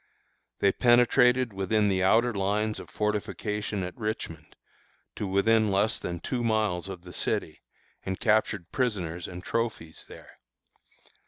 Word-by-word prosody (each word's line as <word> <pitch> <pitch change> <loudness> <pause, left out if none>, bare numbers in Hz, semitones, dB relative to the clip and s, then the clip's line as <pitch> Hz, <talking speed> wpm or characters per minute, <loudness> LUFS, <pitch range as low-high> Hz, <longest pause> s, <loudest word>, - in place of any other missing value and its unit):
"They 100 - +5
penetrated 125 0 +4
within 105 +2 +1
the 95 -2 +1
outer 115 +5 +3
lines 105 +2 -1
of - - -10
fortification 105 -1 -2
at 90 - -6
Richmond, 105 -9 -5 0.6
to 105 - -3
within 110 +3 +3
less 100 +2 +1
than 85 -1 -4
two 125 +5 -3
miles 110 -5 0
of 90 -2 -8
the 90 -1 -11
city, - - -2 0.4
and 95 0 -4
captured 110 -5 +1
prisoners 90 -9 -2
and 90 0 -8
trophies 115 -9 -3
there. - - -14
105 Hz, 135 wpm, -27 LUFS, 95-110 Hz, 0.6 s, They